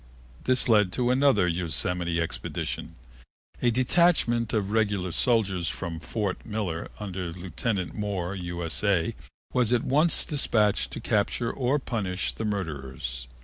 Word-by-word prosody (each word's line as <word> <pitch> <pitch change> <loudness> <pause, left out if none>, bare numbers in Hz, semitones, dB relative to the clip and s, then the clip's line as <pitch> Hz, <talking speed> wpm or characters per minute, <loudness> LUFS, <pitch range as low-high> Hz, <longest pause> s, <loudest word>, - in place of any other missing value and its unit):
This 130 0 +2
led 105 -5 +4
to 125 -1 +1
another 130 -8 +4
Yosemite 85 +1 -1
expedition. 80 - -3 0.7
A 120 - +4
detachment 125 -2 +2
of 105 -3 0
regular 100 -5 +1
soldiers 95 -5 +2
from 85 -3 -5
Fort 100 +2 -3
Miller 100 -7 -3
under 95 -4 -4
Lieutenant 95 +2 -3
Moore, 100 -4 -2
U.S.A., 85 0 0 0.4
was 125 -3 +3
at 120 -2 +3
once 150 +5 +4
dispatched 110 -8 +2
to - - -5
capture 115 0 0
or 135 +2 +1
punish 100 -9 -2
the 110 - -4
murderers. 65 - -4
100 Hz, 125 wpm, -27 LUFS, 85-120 Hz, 0.7 s, led